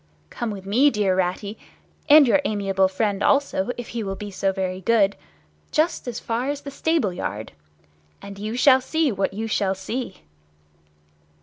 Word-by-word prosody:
Come 235 - -3
with 195 -3 -7
me, 245 +9 +4
dear 205 -6 +1
Ratty, 190 +3 -2 0.5
and 295 -1 +8
your 285 +4 +4
amiable 195 -5 +1
friend 200 +1 -1
also, 275 -6 +1
if 240 - -7
he 235 - -4
will 195 -2 -3
be 205 +1 -7
so 195 0 0
very 185 -1 -3
good, 200 -1 +3 0.6
just 310 -3 0
as 240 -1 -4
far 235 +4 -2
as 285 0 -3
the 280 - -8
stable 280 - 0
yard, 110 - -5 0.7
and 200 0 -10
you 215 +3 -4
shall 260 +1 +5
see 315 +2 0
what 195 -2 -1
you 220 +2 -3
shall 200 -3 0
see!" 205 +2 -5
210 Hz, 170 wpm, -23 LUFS, 195-255 Hz, 0.7 s, and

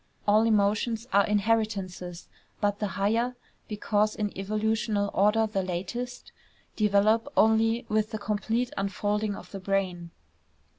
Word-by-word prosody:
All 215 +2 +5
emotions 215 +2 +1
are 200 0 +5
inheritances; 200 -5 -1 0.3
but 205 0 0
the 210 - -1
higher, 230 +5 +1 0.3
because 210 0 0
in 210 -1 -3
evolutional 215 0 -1
order 210 +3 +3
the 210 -3 -1
latest, 190 +8 -5 0.4
develop 215 +5 +2
only 225 +2 +3
with 215 0 +1
the 220 - -4
complete 220 +4 -1
unfolding 205 +1 -1
of - - -11
the 195 - -6
brain. 185 -3 -2
210 Hz, 120 wpm, -27 LUFS, 200-220 Hz, 0.4 s, All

